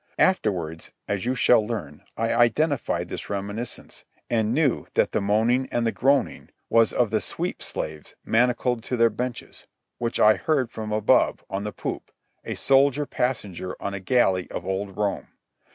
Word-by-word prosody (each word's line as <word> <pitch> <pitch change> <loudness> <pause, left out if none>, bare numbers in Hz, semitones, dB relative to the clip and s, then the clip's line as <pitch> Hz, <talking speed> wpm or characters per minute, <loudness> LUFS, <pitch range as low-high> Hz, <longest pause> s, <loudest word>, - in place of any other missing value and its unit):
Afterwards, 90 - 0 0.2
as 100 +2 -2
you 130 - +1
shall 125 -2 +5
learn, 100 -10 -5 0.2
I 115 0 0
identified 120 - +1
this - - -6
reminiscence 100 +4 -5 0.3
and 110 -2 +1
knew 140 0 +1
that - - +2
the - - 0
moaning 115 +6 +2
and 120 -1 0
the 115 - +2
groaning 135 +2 +1 0.2
was 115 -1 +5
of 120 -4 +1
the 110 - +1
sweep - - -4
slaves 75 -1 -4
manacled 120 0 +1
to 125 - -2
their 115 -1 +4
benches, 125 +3 -6 0.3
which 115 -1 -2
I 110 0 +6
heard 140 -7 0
from 110 -1 -6
above, 105 0 +2
on 100 +1 -3
the 105 - -3
poop, - - -5 0.3
a - - -4
soldier 140 +1 +3
passenger 105 -10 -3
on 100 - -4
a 100 - -4
galley 95 -3 +2
of - - -6
old 95 0 -3
Rome. 105 -1 -1
115 Hz, 165 wpm, -25 LUFS, 100-125 Hz, 0.3 s, I